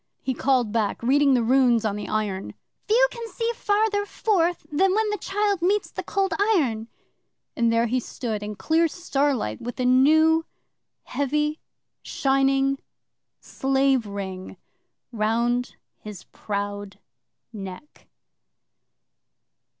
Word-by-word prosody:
'He 260 - -1
called 255 -4 +1
back, 220 -1 -1
reading 275 +2 +4
the 240 - +2
runes 240 -2 +3
on 205 -2 0
the 210 - -5
iron: 205 -3 -3 0.3
"Few - - +5
can 470 -1 -7
see 460 0 -2
Further 415 -1 +1
forth 355 -6 0
Than 375 +6 +2
when 435 0 +1
the 420 - -1
child 405 -2 0
Meets 400 +4 +1
the - - -5
Cold 390 -3 -1 0.2
Iron." 230 - 0 0.7
And 235 -1 +2
there 230 0 +2
he 250 +2 0
stood, 225 -3 -5
in 210 0 -5
clear 325 +9 +2
starlight, 280 - -1
with 245 +2 -6
a 250 - 0
new, 315 +6 +5 0.6
heavy, 300 +3 -1 0.4
shining 270 0 +1 0.6
slave 270 -3 +1
ring 190 -2 -6 0.5
round 235 +2 0 0.2
his 210 -4 -9
proud 205 -1 -5 0.6
neck. 195 +7 -10
265 Hz, 120 wpm, -24 LUFS, 220-330 Hz, 0.7 s, Few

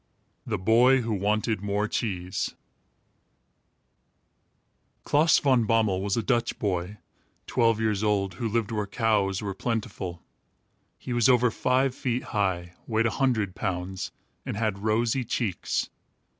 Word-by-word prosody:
THE - - -1
BOY 120 +7 +4
WHO 115 -1 -2
WANTED 105 +1 0
MORE 105 +1 0
CHEESE 95 -6 -2 2.5
Klaas 150 +2 +4
Van 130 -5 +3
Bommel 110 -5 +2
was 100 +1 -1
a 115 - 0
Dutch 120 -2 0
boy, 95 0 -2 0.5
twelve 115 -3 +2
years 110 -2 0
old, 100 -3 +1
who 115 - 0
lived 115 -1 -1
where 105 -2 -2
cows 100 -2 +1
were 100 -1 -3
plentiful. 100 -5 -4 0.7
He 125 - -5
was 120 0 +3
over 125 -1 +4
five 130 +3 +1
feet 125 -1 -2
high, 90 -4 -1
weighed 115 0 +1
a 115 - +2
hundred 115 -9 0
pounds, 95 -1 -3 0.3
and - - -4
had 105 -3 -1
rosy 115 +4 +1
cheeks. 105 -5 -2
110 Hz, 130 wpm, -27 LUFS, 100-120 Hz, 2.5 s, BOY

